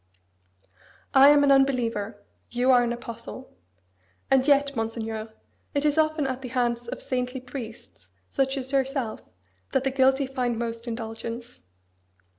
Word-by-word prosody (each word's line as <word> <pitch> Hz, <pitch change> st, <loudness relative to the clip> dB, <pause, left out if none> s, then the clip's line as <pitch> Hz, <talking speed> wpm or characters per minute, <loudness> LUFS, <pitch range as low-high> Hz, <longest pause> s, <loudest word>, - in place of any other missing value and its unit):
I 275 Hz, +1 st, +8 dB
am 290 Hz, 0 st, +6 dB
an 280 Hz, -, +5 dB
unbeliever: 235 Hz, -6 st, +1 dB, 0.3 s
you 245 Hz, +2 st, +2 dB
are 250 Hz, -1 st, +6 dB
an 240 Hz, -1 st, 0 dB
apostle! 235 Hz, +2 st, -7 dB, 0.8 s
And 265 Hz, 0 st, +4 dB
yet, 280 Hz, -1 st, +4 dB
Monseigneur, 225 Hz, -1 st, -3 dB, 0.4 s
it 285 Hz, +1 st, +1 dB
is 295 Hz, -1 st, +3 dB
often 310 Hz, -1 st, +2 dB
at 260 Hz, -1 st, -3 dB
the 260 Hz, -, -5 dB
hands 240 Hz, -1 st, -1 dB
of -, -, -6 dB
saintly 250 Hz, 0 st, -2 dB
priests, 225 Hz, -, -9 dB, 0.2 s
such 270 Hz, -, 0 dB
as 265 Hz, 0 st, -4 dB
yourself, 270 Hz, -4 st, -1 dB, 0.5 s
that 265 Hz, -, +2 dB
the 270 Hz, -, 0 dB
guilty 265 Hz, +1 st, +3 dB
find 250 Hz, -3 st, -2 dB
most 230 Hz, 0 st, -4 dB
indulgence. 230 Hz, +1 st, -6 dB
250 Hz, 140 wpm, -26 LUFS, 230-270 Hz, 0.8 s, I